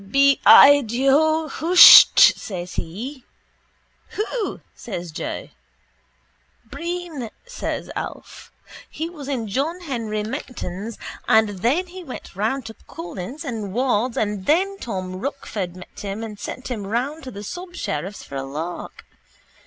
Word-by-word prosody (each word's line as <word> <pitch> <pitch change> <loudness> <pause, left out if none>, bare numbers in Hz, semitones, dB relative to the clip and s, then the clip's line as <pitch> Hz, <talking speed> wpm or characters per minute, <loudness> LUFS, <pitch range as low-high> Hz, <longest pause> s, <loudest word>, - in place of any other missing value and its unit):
—Bi 275 +7 +3
i 285 +1 +9
dho 280 +7 +2
husht, 340 +5 +8 0.2
says 180 -4 -7
he. 245 - -6 0.9
—Who? 430 +1 -3
says 175 -6 -7
Joe. 155 - -5 1.2
—Breen, 340 -8 -5 0.2
says - - -5
Alf. - - -8 0.4
He 325 +2 -5
was 295 -6 -9
in 250 -6 -3
John 290 - -2
Henry 230 -9 -3
Menton's 225 -4 -6 0.3
and 220 -1 +4
then 275 - +1
he 365 +1 -10
went 260 - -9
round 225 +6 -1
to 225 - -8
Collis 185 - -7
and 220 -7 -5
Ward's 245 -1 0
and 205 -3 -2
then 390 +6 +2
Tom 185 -4 -5
Rochford 205 -7 -5
met 180 - -12
him 200 +2 -5
and 210 -2 -8
sent 255 +5 -7
him 215 -6 -4
round 260 +9 -2
to - - -6
the 205 -3 -9
subsheriff's 350 - -5
for 140 - -8
a 135 - -3
lark. 155 +6 -7
240 Hz, 130 wpm, -22 LUFS, 200-300 Hz, 1.2 s, i